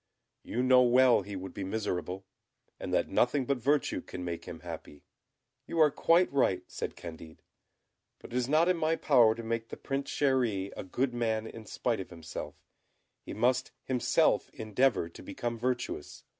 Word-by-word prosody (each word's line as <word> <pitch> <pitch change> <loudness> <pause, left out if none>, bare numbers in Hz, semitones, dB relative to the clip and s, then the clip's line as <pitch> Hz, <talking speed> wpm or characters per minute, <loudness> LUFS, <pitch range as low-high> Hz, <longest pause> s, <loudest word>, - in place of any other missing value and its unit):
You 125 - -2
know 130 0 +6
well 125 -1 +5
he 100 +1 -7
would 95 0 -6
be 100 - -5
miserable, 95 -2 -3 0.5
and - - -5
that - - +2
nothing 130 +2 +2
but 140 0 0
virtue 145 +4 +1
can 90 - -7
make 85 -1 -5
him - - -8
happy." 75 - -9 0.6
"You - - -4
are 155 -2 +6
quite 170 +3 +3
right," 95 -9 +2
said - - -5
Candid; 80 -1 -10 0.7
"but - - -12
it - - -4
is 125 0 0
not 155 +3 +4
in 180 -1 +3
my 160 0 +1
power 120 -8 +4
to 115 - -7
make 115 0 -2
the - - -7
Prince 140 0 -3
Chéri 120 -9 +1
a - - -5
good 125 +7 -1
man 110 -2 0
in 110 -1 -9
spite 120 -4 -1
of 95 - -6
himself; 85 -2 -7 0.7
he - - -8
must 125 +3 +2
himself 125 -2 +2
endeavour 110 -2 +1
to 85 - -13
become 120 -1 -4
virtuous. 125 - -3
120 Hz, 175 wpm, -30 LUFS, 100-130 Hz, 0.7 s, know